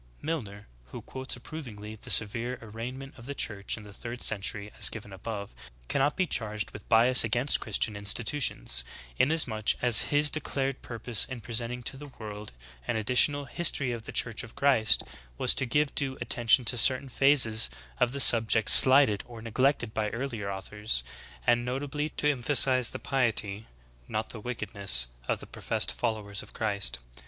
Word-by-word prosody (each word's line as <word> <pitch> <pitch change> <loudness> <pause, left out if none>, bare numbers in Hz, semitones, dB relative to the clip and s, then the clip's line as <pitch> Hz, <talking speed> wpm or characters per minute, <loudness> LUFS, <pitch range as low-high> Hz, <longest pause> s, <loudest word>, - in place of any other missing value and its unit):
"^' - - -30 0.2
9. - - -9
Milner, 105 -11 -6 0.2
who - - -10
quotes 130 0 -5
approvingly 115 -6 -10
the 105 - -12
severe 115 +4 +3
arraign 115 +3 -8
ment 135 0 -11
of 120 - -12
the 140 - -6
Church 105 -4 -2
in 110 - -12
the 105 -1 -14
third 120 +3 -6
century 105 0 -1
as - - +6
given 105 -2 -10
above, 100 - -8 0.4
cannot 140 +2 0
be 185 - +1
charged 105 -8 -4
with 105 - -13
bias 120 +3 +5
against 120 +5 +1
Christian 110 0 -1
institutions, 100 - -1 0.4
inasmuch 125 -8 +1
as 120 -3 +4
his 145 0 +3
declared 135 -3 -1
purpose 115 -1 -1
in 130 -2 -8
presenting 120 +2 -4
to 135 - -5
the 145 +1 -11
world 105 -1 -9 0.4
an - - -2
additional 125 +6 +1
''History 135 -2 -1
of 115 -1 -8
the - - -8
Church 115 -2 -1
of 115 - -12
Christ" 135 -6 +3 0.3
was - - +3
to 135 - 0
give 145 +4 0
due 135 -2 -2
attention 120 +1 +2
to 120 +1 +1
certain 130 +2 +4
phases 125 - +3 0.3
of 120 - +1
the 140 - -6
subject 115 -3 +6
slighted 130 -6 +9
or 120 -2 -12
neglected 115 0 -1
by 105 -1 -2
earlier 115 -3 -5
authors, 100 - -4 0.4
and 120 0 +2
notably 145 +4 -4
to 150 - -3
emphasize 130 -1 +1
the - - -7
piety, 115 -5 -2 0.4
not 110 +1 -4
the 115 - -6
wickedness, 100 - -2 0.2
of - - -2
the - - -10
professed - - -2
followers 105 -4 -4
of - - -16
Christ. 100 - -3
115 Hz, 170 wpm, -27 LUFS, 105-135 Hz, 0.4 s, slighted